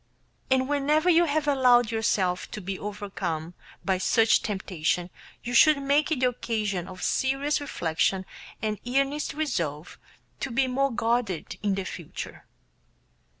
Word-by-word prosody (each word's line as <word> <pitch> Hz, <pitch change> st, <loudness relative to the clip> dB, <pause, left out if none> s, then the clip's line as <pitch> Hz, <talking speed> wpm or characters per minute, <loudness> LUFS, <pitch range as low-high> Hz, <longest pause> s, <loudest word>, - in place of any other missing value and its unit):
And 260 Hz, 0 st, +3 dB
whenever 295 Hz, +4 st, +2 dB
you 340 Hz, +1 st, +5 dB
have 300 Hz, -1 st, 0 dB
allowed 250 Hz, -4 st, +4 dB
yourself 190 Hz, -5 st, 0 dB
to -, -, -6 dB
be 190 Hz, -1 st, -5 dB
overcome 190 Hz, -5 st, -4 dB, 0.3 s
by 190 Hz, -2 st, +1 dB
such 225 Hz, +3 st, +4 dB
temptation 180 Hz, -3 st, -2 dB, 0.3 s
you 245 Hz, -, -4 dB
should 300 Hz, +4 st, +6 dB
make 285 Hz, +3 st, +2 dB
it 280 Hz, -5 st, 0 dB
the 250 Hz, -, +4 dB
occasion 210 Hz, -7 st, -2 dB
of 185 Hz, -1 st, -9 dB
serious 275 Hz, +3 st, +1 dB
reflection 185 Hz, -, 0 dB, 0.4 s
and 215 Hz, -1 st, -1 dB
earnest 275 Hz, +4 st, 0 dB
resolve 170 Hz, -, -3 dB, 0.4 s
to 275 Hz, -, -3 dB
be 260 Hz, +3 st, +2 dB
more 270 Hz, +2 st, +1 dB
guarded 230 Hz, -6 st, -1 dB
in 200 Hz, -1 st, +1 dB
future. 170 Hz, -4 st, -8 dB
230 Hz, 135 wpm, -26 LUFS, 190-275 Hz, 0.4 s, should